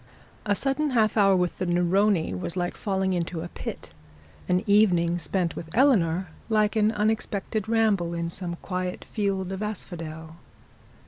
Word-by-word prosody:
A 205 - +3
sudden 275 +6 0
half 215 -2 +3
hour 195 -3 +5
with 180 -1 0
the 185 - 0
Neroni, 175 - +2
was 95 - -4
like 175 0 -1
falling 190 -2 -1
into 170 -1 -2
a 175 - -6
pit; - - -7 0.6
an 180 +2 +2
evening 180 -5 +3
spent 175 +1 -1
with 160 - -7
Eleanor 190 - +3 0.2
like 215 0 +2
an 215 0 +3
unexpected 215 -1 -1
ramble 205 -7 +2
in 170 0 -3
some 175 -1 -5
quiet 180 -1 -3
fields 195 -3 -2
of 190 +1 -4
asphodel. 165 -6 -6
190 Hz, 150 wpm, -26 LUFS, 170-210 Hz, 0.6 s, hour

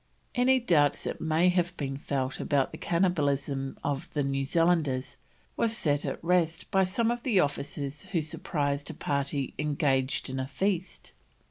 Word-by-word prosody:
Any 260 +1 +4
doubts 155 - +3
that - - -4
may 160 +3 +3
have 180 0 0
been 135 -2 -3
felt 135 -1 -2
about 140 -2 +1
the - - -8
cannibalism 145 -6 0
of 140 -1 -2
the 145 - +2
New 135 0 0
Zealanders 150 -4 +1 0.4
was 225 -1 +1
set 145 -2 +1
at - - -4
rest 165 -2 +1
by 195 -1 +4
some 225 +5 +1
of 240 0 -3
the 230 -7 +2
officers 145 -1 -2
who 175 - -1
surprised 145 -2 -2
a 160 - -6
party 140 -1 -2
engaged 140 -4 +1
in 130 0 -3
a 130 - -2
feast. 190 +5 -2
150 Hz, 160 wpm, -29 LUFS, 140-180 Hz, 0.4 s, Any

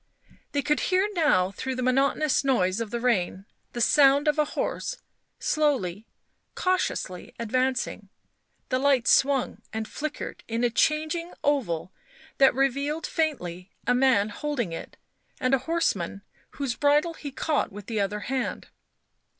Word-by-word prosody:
They 285 -1 0
could 300 - +1
hear 375 +2 +3
now, 195 - +3
through 260 +7 -4
the 255 - -2
monotonous 270 +3 +2
noise 220 -6 +1
of 225 - -3
the 235 - -3
rain, 195 -5 0 0.3
the 240 - -3
sound 280 +3 +5
of 300 0 +2
a 300 - +4
horse - - -2 0.4
slowly, 230 - 0 0.5
cautiously 365 - -1
advancing; 245 -3 -1 0.6
the 255 - +1
light 270 -3 +3
swung 270 -2 +3
and 220 0 -3
flickered 300 0 -5
in 230 +1 -1
a 240 - +2
changing 315 +6 0
oval 190 - 0 0.5
that 270 -2 +6
revealed 280 +4 0
faintly 185 - -2 0.2
a 245 - +3
man 250 -5 +3
holding 240 - -3
it - - -8 0.4
and 255 +1 +1
a 270 - +5
horseman 200 - 0 0.3
whose 275 -4 -2
bridle 295 +3 +3
he 295 -2 -7
caught 290 -2 -1
with 205 0 -9
the 220 -1 -2
other 205 +1 -1
hand. 260 +2 -3
260 Hz, 140 wpm, -26 LUFS, 215-295 Hz, 0.6 s, that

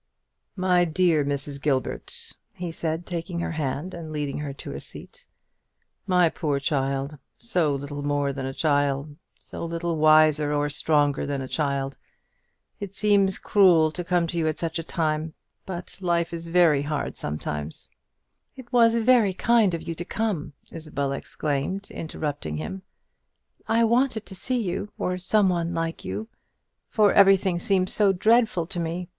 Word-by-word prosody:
"My 180 -2 +3
dear 165 -2 +2
Mrs. 140 0 -3
Gilbert," 135 -4 -3 0.2
he 175 -1 -5
said, 165 +1 -3
taking 170 0 -4
her - - -2
hand, 155 +3 -3
and 165 -2 -7
leading 145 -2 -3
her 150 -1 -4
to 135 - -8
a 70 - -5
seat; - - -8 0.8
"my 180 -2 +4
poor 150 -3 -1
child, 140 0 -1 0.2
so 175 -11 0
little 140 +1 -5
more 145 -1 0
than 135 -1 -4
a - - -3
child, 145 0 0 0.2
so - - -8
little 170 0 -2
wiser 155 -1 +5
or 145 0 0
stronger 145 -2 +2
than 140 -1 -2
a 130 - -5
child, 140 -2 -2 0.8
it 200 -1 -7
seems 200 -3 +3
cruel 175 -6 +4
to 180 +3 -5
come 175 0 +1
to 170 +1 -3
you 160 - +1
at 155 - -1
such 165 0 -2
a - - -4
time; 155 -1 -2 0.3
but 180 0 -7
life 170 -2 0
is 170 0 -5
very 165 -4 +4
hard 145 0 -3
sometimes 75 0 -4 0.3
" - - -52
"It 250 -1 -12
was 230 -1 +5
very 230 -4 +4
kind 220 -4 +3
of 165 - -8
you 165 - -2
to 165 - -6
come," 175 -8 -2 0.2
Isabel 150 -4 -3
exclaimed, 150 +7 -3
interrupting 145 - -4
him. 85 +5 -5 0.9
"I 230 +1 +3
wanted 235 -1 +2
to 195 - -9
see 245 +6 -1
you, 190 +2 -3
or 180 0 -2
some 200 +2 +3
one 170 -1 -1
like 165 -1 -3
you; 220 - -4 0.6
for 210 -3 +4
everything 195 -3 +5
seems 185 0 +1
so 205 -2 +4
dreadful 215 -2 +3
to 175 +1 -4
me. 170 +2 -3
165 Hz, 160 wpm, -25 LUFS, 145-185 Hz, 0.9 s, wiser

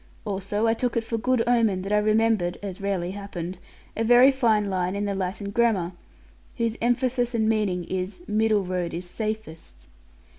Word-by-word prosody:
Also 205 +1 -1
I 225 - +4
took 240 +1 -1
it 230 - +1
for 225 0 -3
good 245 0 +1
omen 225 -6 +2
that 195 - -5
I 210 - +5
remembered 215 -4 +2
(as 195 -1 -6
rarely 190 -3 -1
happened) 190 -3 -6 0.4
a 225 - 0
very 245 +4 +7
fine 225 -6 +2
line 185 -1 -1
in 205 +1 -1
the 200 - -1
Latin 195 +1 -3
grammar, 205 -6 +1 0.7
whose 230 -2 0
emphasis 245 0 +1
and 220 -1 +2
meaning 210 -5 +1
is 185 - -4
'middle 215 -1 +2
road 180 -2 -3
is 175 +1 -6
safest.' 175 - -6
210 Hz, 175 wpm, -25 LUFS, 185-230 Hz, 0.7 s, very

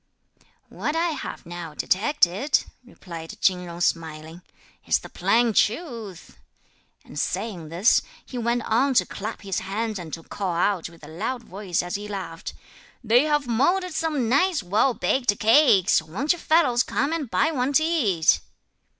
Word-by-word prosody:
"What 300 - -3
I 335 +1 +1
have 295 - -6
now 170 -2 -7
detected," 220 - +2 0.2
replied 170 -9 -10
Chin 185 -1 +2
Jung 175 -1 -8
smiling, 160 0 -2 0.5
"is - - +4
the - - -11
plain 235 -1 +2
truth!" 225 - -2 0.7
and - - -7
saying 185 -4 -3
this 180 +8 +3 0.2
he - - -11
went 235 0 0
on 260 +5 +1
to - - +4
clap 215 +2 -6
his 195 -2 -2
hands 215 +2 -3
and 165 -3 -8
to 165 - -14
call 185 -1 -3
out 175 -1 0
with 170 -2 -18
a - - -10
loud 220 +10 -4
voice 190 -4 -3
as 175 - -6
he 205 +1 -4
laughed: 185 -5 -6 0.5
"They 240 +5 +4
have 295 -2 +1
moulded 345 +10 +1
some 305 -6 -1
nice 290 - +2
well 210 +7 +2
baked 245 -6 +1
cakes, 215 - +5
won't 205 - -1
you 350 - -8
fellows 290 -8 +3
come 280 +5 -1
and 305 -7 -3
buy 320 - +2
one 260 -2 0
to 315 - +4
eat!" 200 - +3
220 Hz, 160 wpm, -24 LUFS, 175-275 Hz, 0.7 s, cakes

